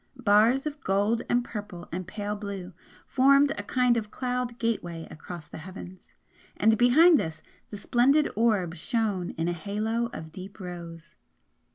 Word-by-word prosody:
Bars 230 Hz, +3 st, +4 dB
of 295 Hz, -1 st, -5 dB
gold 205 Hz, +4 st, +1 dB
and 240 Hz, 0 st, +2 dB
purple 205 Hz, -6 st, -7 dB
and 185 Hz, +1 st, -4 dB
pale 205 Hz, +1 st, -4 dB
blue 200 Hz, -3 st, -6 dB, 0.3 s
formed 275 Hz, +2 st, +4 dB
a -, -, -3 dB
kind 250 Hz, +3 st, +2 dB
of 215 Hz, -2 st, -3 dB
cloud 250 Hz, 0 st, -3 dB
gateway 175 Hz, -9 st, -3 dB
across 165 Hz, 0 st, -9 dB
the -, -, -10 dB
heavens, 185 Hz, +1 st, -10 dB, 0.5 s
and 220 Hz, 0 st, +4 dB
behind 295 Hz, +8 st, +6 dB
this 160 Hz, -1 st, -5 dB, 0.3 s
the 205 Hz, -, -7 dB
splendid 265 Hz, +8 st, +3 dB
orb 205 Hz, -6 st, +2 dB
shone 200 Hz, 0 st, -1 dB
in 165 Hz, +1 st, -1 dB
a 175 Hz, -, 0 dB
halo 215 Hz, +6 st, -2 dB
of 160 Hz, -6 st, -8 dB
deep 195 Hz, +5 st, -10 dB
rose. 170 Hz, -3 st, -9 dB
210 Hz, 155 wpm, -27 LUFS, 180-240 Hz, 0.5 s, behind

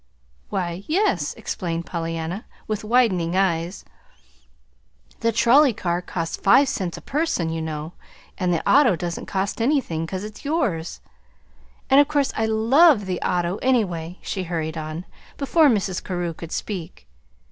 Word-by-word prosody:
"Why, 180 Hz, 0 st, -3 dB
yes," 305 Hz, -, +1 dB
explained 170 Hz, -2 st, -4 dB
Pollyanna, 165 Hz, +3 st, -4 dB, 0.2 s
with 215 Hz, -1 st, -3 dB
widening 210 Hz, -7 st, +2 dB
eyes; 180 Hz, -1 st, 0 dB, 1.3 s
"the 230 Hz, -, +1 dB
trolley 245 Hz, +4 st, +5 dB
car 175 Hz, -3 st, -2 dB
costs 165 Hz, -2 st, -4 dB
five 270 Hz, +8 st, +5 dB
cents 180 Hz, -4 st, -3 dB
a -, -, -9 dB
person, 295 Hz, -, -1 dB
you 160 Hz, 0 st, -3 dB
know, 155 Hz, +1 st, -5 dB, 0.4 s
and 180 Hz, -2 st, 0 dB
the 170 Hz, -, -1 dB
auto 265 Hz, -9 st, +5 dB
doesn't 170 Hz, -1 st, -5 dB
cost 195 Hz, +3 st, -2 dB
anything, 230 Hz, -, 0 dB
'cause 185 Hz, +2 st, -4 dB
it's 210 Hz, 0 st, -9 dB
yours. 235 Hz, -, -1 dB, 0.9 s
And 270 Hz, -, +6 dB
of 290 Hz, -, +5 dB
course 290 Hz, -2 st, 0 dB
I 220 Hz, -, 0 dB
LOVE 225 Hz, -, +5 dB
the 185 Hz, -1 st, -3 dB
auto, 175 Hz, +1 st, 0 dB
anyway," 185 Hz, -9 st, 0 dB
she 190 Hz, -2 st, -3 dB
hurried 160 Hz, -2 st, -3 dB
on, 155 Hz, +2 st, -5 dB, 0.3 s
before 295 Hz, +2 st, +4 dB
Mrs. 195 Hz, -5 st, 0 dB
Carew 175 Hz, -2 st, -3 dB
could 165 Hz, +1 st, -9 dB
speak. 165 Hz, -, -5 dB
185 Hz, 145 wpm, -23 LUFS, 170-235 Hz, 1.3 s, And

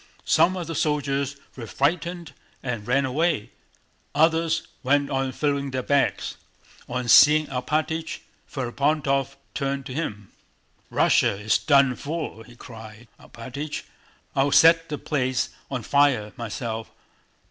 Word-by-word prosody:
Some 185 Hz, +1 st, +3 dB
of 175 Hz, -, -4 dB
the 165 Hz, -, -5 dB
soldiers 140 Hz, -2 st, -1 dB, 0.2 s
were 115 Hz, -3 st, -7 dB
frightened 165 Hz, +4 st, -1 dB, 0.3 s
and 120 Hz, -5 st, -4 dB
ran 135 Hz, +2 st, +2 dB
away, 150 Hz, -1 st, 0 dB, 0.6 s
others 165 Hz, +1 st, +2 dB, 0.2 s
went 140 Hz, +2 st, +1 dB
on 135 Hz, -1 st, 0 dB
filling 140 Hz, +1 st, -1 dB
their 130 Hz, -1 st, -3 dB
bags. 140 Hz, +1 st, 0 dB, 0.5 s
On 125 Hz, 0 st, -3 dB
seeing 150 Hz, +5 st, +7 dB
Alpátych, 155 Hz, +5 st, -2 dB, 0.3 s
Ferapóntov 140 Hz, +1 st, 0 dB, 0.2 s
turned 135 Hz, -1 st, -2 dB
to 130 Hz, -, -7 dB
him: 105 Hz, -, -5 dB, 0.6 s
"Russia -, -, +3 dB
is 105 Hz, +1 st, +2 dB
done 140 Hz, -3 st, +4 dB
for!" 150 Hz, -7 st, -5 dB
he 120 Hz, -, -16 dB
cried. 110 Hz, -1 st, -12 dB
"Alpátych, 140 Hz, +6 st, -7 dB, 0.5 s
I'll 140 Hz, +1 st, +2 dB
set 165 Hz, +2 st, +6 dB
the 150 Hz, -, -3 dB
place 130 Hz, -5 st, -1 dB, 0.2 s
on 130 Hz, -4 st, -4 dB
fire 135 Hz, -7 st, +2 dB
myself. 115 Hz, 0 st, -5 dB
140 Hz, 125 wpm, -24 LUFS, 125-155 Hz, 0.6 s, seeing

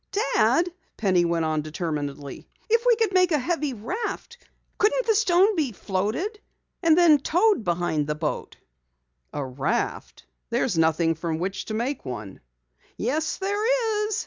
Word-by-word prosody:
"Dad," 345 Hz, +2 st, +3 dB, 0.3 s
Penny 185 Hz, -5 st, +2 dB
went 170 Hz, -1 st, 0 dB
on 155 Hz, -1 st, 0 dB
determinedly, 150 Hz, -3 st, -5 dB, 0.2 s
"if 460 Hz, +1 st, +4 dB
we 480 Hz, -, +6 dB
could 445 Hz, -3 st, 0 dB
make 365 Hz, -1 st, +4 dB
a 305 Hz, -, +4 dB
heavy 300 Hz, -1 st, -1 dB
raft, 440 Hz, -, -5 dB, 0.4 s
couldn't 470 Hz, +4 st, +2 dB
the 445 Hz, -, +3 dB
stone 400 Hz, 0 st, +4 dB
be 290 Hz, -8 st, 0 dB
floated? 215 Hz, -, -2 dB, 0.4 s
It 330 Hz, -3 st, +5 dB
might 335 Hz, -4 st, +7 dB
be -, -, -17 dB
towed 360 Hz, -, +2 dB
behind 170 Hz, -4 st, 0 dB
the 150 Hz, -, -1 dB
boat." 150 Hz, 0 st, -4 dB, 0.7 s
"A 145 Hz, -, -3 dB
raft? 140 Hz, -, -3 dB, 0.2 s
There's 235 Hz, -3 st, 0 dB
nothing 165 Hz, 0 st, +2 dB
from 160 Hz, 0 st, -3 dB
which 190 Hz, +3 st, -3 dB
to 215 Hz, -, -4 dB
make 250 Hz, +5 st, -2 dB
one." 110 Hz, -7 st, -7 dB, 0.6 s
"Yes, 300 Hz, +7 st, -1 dB
there 425 Hz, +2 st, 0 dB
is!" 430 Hz, 0 st, -1 dB
240 Hz, 150 wpm, -25 LUFS, -, 0.7 s, might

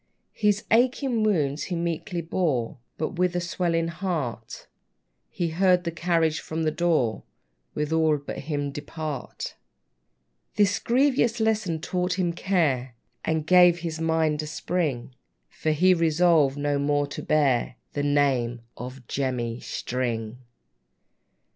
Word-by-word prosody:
His 210 Hz, -1 st, +1 dB
aching 245 Hz, +1 st, +2 dB
wounds 155 Hz, -9 st, +1 dB
he 180 Hz, -, -3 dB
meekly 170 Hz, +2 st, -2 dB
bore; 155 Hz, -9 st, -1 dB, 0.2 s
But 165 Hz, +3 st, -3 dB
with 180 Hz, 0 st, +2 dB
a -, -, +2 dB
swelling 170 Hz, -1 st, -1 dB
heart 155 Hz, -11 st, -4 dB, 0.6 s
He 170 Hz, -1 st, -2 dB
heard 180 Hz, +2 st, +3 dB
the 170 Hz, -, -2 dB
carriage 165 Hz, -1 st, +1 dB
from 160 Hz, +1 st, -4 dB
the 155 Hz, -, +1 dB
door, 155 Hz, -10 st, +1 dB, 0.5 s
With 150 Hz, +1 st, -1 dB
all 160 Hz, -2 st, +3 dB
but 145 Hz, -, -7 dB
him, 145 Hz, -1 st, -3 dB
depart. 145 Hz, -3 st, -6 dB, 1.0 s
This 205 Hz, -1 st, +3 dB
grievous 245 Hz, -2 st, +2 dB
lesson 215 Hz, -7 st, 0 dB
taught 180 Hz, +2 st, -1 dB
him 175 Hz, -2 st, 0 dB
care, 145 Hz, -10 st, 0 dB, 0.3 s
And 160 Hz, -1 st, -1 dB
gave 180 Hz, 0 st, +6 dB
his 165 Hz, -1 st, -4 dB
mind 160 Hz, -2 st, +1 dB
a 155 Hz, -, -6 dB
spring; 150 Hz, -6 st, -2 dB, 0.4 s
For 155 Hz, -, -3 dB
he 180 Hz, +5 st, +4 dB
resolved 165 Hz, -4 st, +3 dB
no 145 Hz, 0 st, 0 dB
more 145 Hz, 0 st, +1 dB
to 145 Hz, -, -7 dB
bear 135 Hz, -5 st, +1 dB, 0.2 s
The 145 Hz, -, -1 dB
name 135 Hz, -5 st, +1 dB
of 125 Hz, 0 st, -9 dB
JEMMY 125 Hz, -3 st, -2 dB
STRING! 120 Hz, -3 st, -3 dB
160 Hz, 130 wpm, -25 LUFS, 140-180 Hz, 1.0 s, gave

